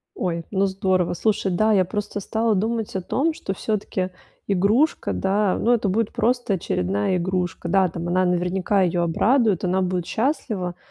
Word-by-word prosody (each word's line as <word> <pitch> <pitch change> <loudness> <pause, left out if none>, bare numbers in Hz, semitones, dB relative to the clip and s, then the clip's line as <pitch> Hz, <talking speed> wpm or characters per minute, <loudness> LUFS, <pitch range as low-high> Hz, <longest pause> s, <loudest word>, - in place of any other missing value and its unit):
Ой, 170 -3 -2
ну 195 -1 +2
здорово. 190 -2 0
Слушай, 200 +1 0
да, 215 +5 +2
я 190 -3 +3
просто 205 +2 -4
стала 220 +2 0
думать 220 +2 -2
о 190 - -1
том, 285 - 0
что 195 - -5
всё-таки 195 -2 -2 0.4
игрушка, 205 - +2
да, 195 0 +1
ну, 235 - +2
это 215 -4 +1
будет 215 +3 0
просто 245 -3 +1
очередная 100 - 0
игрушка. 180 -1 -2
Да, 190 +1 +3
там, 170 +1 -5
она 185 +1 +2
наверняка 180 +2 +1
её 175 -1 +1
обрадует, 215 +4 +2
она 185 +1 +1
будет 180 -1 -1
счастлива, 215 - -1
190 Hz, 165 wpm, -23 LUFS, 180-215 Hz, 0.4 s, я